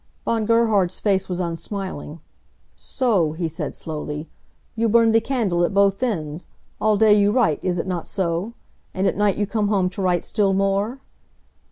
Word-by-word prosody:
Von 225 -2 0
Gerhard's 220 -6 +2
face 190 -2 0
was 180 -1 -3
unsmiling. 170 -2 -5 0.5
"So," 200 - 0
he 165 +1 -2
said, 160 - -5
slowly. 150 0 -5 0.5
"You 230 0 +1
burn 230 +1 +4
the 225 0 +4
candle 220 -9 0
at 185 - 0
both 200 +1 +3
ends. 165 -10 -3 0.3
All 215 -1 +3
day 215 0 +5
you 205 0 +4
write, 215 - +1
is 180 -1 0
it 165 - -2
not 180 -3 -4
so? 185 +3 -2 0.4
And 190 - 0
at - - +1
night 205 -1 +1
you 205 - +1
come 210 0 -1
home 190 -3 +1
to 195 - -5
write 180 -2 +1
still 200 -3 +1
more? 195 +5 0
195 Hz, 175 wpm, -22 LUFS, 175-215 Hz, 0.5 s, day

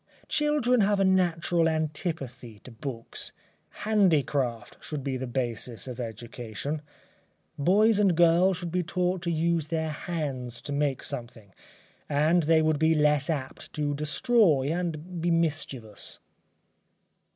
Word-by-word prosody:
Children 295 -5 +2
have 205 0 +2
a 195 - +4
natural 175 -3 +2
antipathy 145 - -3
to 130 - -11
books 115 0 -4 0.5
handicraft 145 - +1
should 150 -3 -5
be 135 -1 -2
the 130 0 -4
basis 120 -1 -3
of 125 -1 -6
education. 120 +5 -5 0.8
Boys 205 +7 +4
and 190 -5 +3
girls 175 +2 +5
should 175 -1 -5
be 180 +1 +1
taught 180 +1 -1
to 170 -1 -1
use 165 -1 +1
their 160 -1 -1
hands 140 -7 -4
to 145 - -6
make 140 -2 0
something, 115 -5 -6 0.6
and 155 +4 +3
they 160 0 +3
would 155 -2 +2
be 160 0 +4
less 150 -1 +2
apt 135 -5 -4
to 145 -1 -1
destroy 150 - +3
and 175 0 -4
be 175 - +1
mischievous. 145 -9 -1
155 Hz, 130 wpm, -27 LUFS, 130-175 Hz, 0.8 s, girls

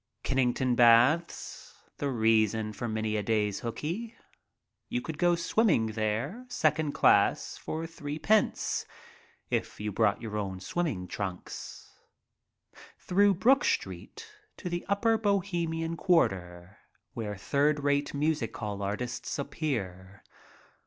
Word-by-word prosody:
Kennington 130 -1 +1
Baths, 120 +8 +3 0.2
the 145 - -1
reason 110 -2 +2
for 120 - -4
many 110 -1 -1
a - - 0
day's 105 -1 0
hookey. 175 - -4 0.7
You 245 - -1
could 160 -10 -7
go 175 -1 +4
swimming 170 - +2
there, 110 - -2
second 155 -8 +1
class, - - +3
for 160 +1 -5
threepence 165 +6 0 0.6
(if - - -2
you 105 0 -3
brought 100 +1 +2
your 110 -2 -5
own 95 -3 -3
swimming 105 - -2
trunks). 95 -3 -6 1.1
Through 200 +2 +3
Brook 265 +9 +4
Street 445 +1 -3 0.3
to 180 - -5
the 175 0 -3
upper 220 +3 +2
Bohemian 175 -5 -1
quarter, 95 - 0 0.3
where 105 -3 -4
third 145 +8 +1
rate 145 0 +1
music 145 -6 -1
hall 105 -2 -4
artists 105 +5 -3
appear. 100 - -4
135 Hz, 115 wpm, -29 LUFS, 105-170 Hz, 1.1 s, go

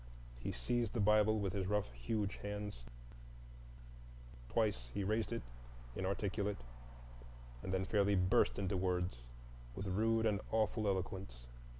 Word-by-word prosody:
He - - -3
seized 115 - 0
the 120 - -1
Bible 105 +1 +5
with 100 -3 -1
his 95 -2 -1
rough, 105 -9 +1
huge 100 - -2
hands; 105 -10 -5 1.6
twice 105 - +1
he 100 - 0
raised 110 +4 0
it 115 - -2 0.5
inarticulate, 100 +2 -1 1.0
and 95 - -4
then 95 0 +1
fairly 100 0 +3
burst 90 0 +4
into 95 0 0
words, 90 -4 0 0.6
with 95 - -4
rude 110 +4 +2
and 105 -2 +2
awful 110 -1 +1
eloquence. 95 -10 -2
100 Hz, 125 wpm, -37 LUFS, 95-105 Hz, 1.6 s, Bible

